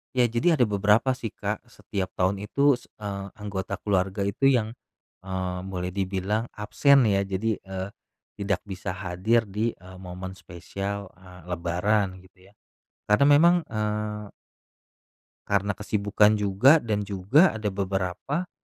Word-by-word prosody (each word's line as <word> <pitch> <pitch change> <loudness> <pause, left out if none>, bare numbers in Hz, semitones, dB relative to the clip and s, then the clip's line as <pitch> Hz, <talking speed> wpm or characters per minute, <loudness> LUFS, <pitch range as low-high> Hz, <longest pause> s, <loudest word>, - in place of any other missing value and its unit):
Ya, 125 - +4
jadi 160 +9 +3
ada 130 - +3
beberapa 105 +4 +3
sih, 125 -3 -3
Kak. - - -4
Setiap 95 -2 -4
tahun 95 +2 +1
itu, 140 0 +3
se - - -19 0.2
eee, 100 -1 -4
anggota 100 -2 -4
keluarga 95 0 0
itu 100 +7 +1
yang, 115 -5 +2 0.6
eee, 95 -1 -3
boleh 90 -1 -3
dibilang 100 +4 -1
absen 135 +6 +4
ya. 100 -3 +3
Jadi, 100 +3 -1
eee, 95 0 -6 0.5
tidak 100 -2 -1
bisa 95 -1 -5
hadir 100 +5 +1
di, 105 +3 -2
eee, 95 +1 -13
momen 95 0 -7
spesial, 100 +2 -6
eee, 90 -1 -14
lebaran 95 +2 0
gitu 95 0 -21
ya. 100 - -22 0.6
Karena 105 +7 +5
memang, 155 +5 +6 0.2
eee 105 -1 -2 1.2
karena 100 0 +1
kesibukan 105 0 +2
juga 105 +10 +5
dan 105 -3 -1
juga 105 - +3
ada 110 -2 -2
beberapa 100 - -2
100 Hz, 140 wpm, -26 LUFS, 95-110 Hz, 1.2 s, memang